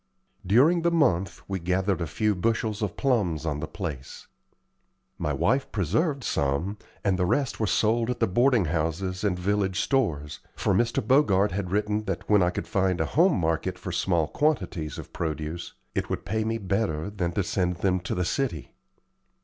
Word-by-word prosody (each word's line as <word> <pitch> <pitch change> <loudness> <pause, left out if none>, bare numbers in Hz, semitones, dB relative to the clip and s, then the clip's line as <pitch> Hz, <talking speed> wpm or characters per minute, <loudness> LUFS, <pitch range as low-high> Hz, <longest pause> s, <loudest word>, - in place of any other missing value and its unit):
During 135 - +4
the 170 - +3
month 125 - +1
we 95 -1 -2
gathered 95 +2 0
a 85 - -1
few 105 +6 +1
bushels 110 +2 -1
of 105 -4 -2
plums 100 - +1
on 75 -3 -1
the 80 - -4
place. 75 -10 -6 0.9
My 75 - -1
wife 130 - +1
preserved 120 - 0
some, 80 +9 -1 0.2
and 95 -2 +1
the 90 - +2
rest 140 +5 0
were 110 - +1
sold 115 +4 +2
at 125 - -2
the - - +4
boarding 120 +2 +3
houses 80 +4 -2
and 95 -4 +1
village 95 +1 0
stores, 80 - 0 0.2
for - - 0
Mr. 120 -2 +1
Bogart 105 -8 +4
had 95 0 -3
written 105 +2 0
that 95 -3 -4
when 105 -2 +5
I 90 - +3
could 90 - -4
find 95 -2 +1
a - - +1
home 170 +1 +3
market 80 -1 -1
for - - -6
small 85 -5 +1
quantities 95 - -1
of - - -9
produce, 80 +1 -4 0.2
it - - -2
would - - -3
pay 110 +3 -1
me 115 +1 -1
better 100 -4 -1
than 90 -4 -2
to 100 - 0
send 90 -1 0
them 90 +1 +1
to 90 - -4
the 90 - 0
city. 120 - -2
95 Hz, 180 wpm, -26 LUFS, 85-115 Hz, 0.9 s, when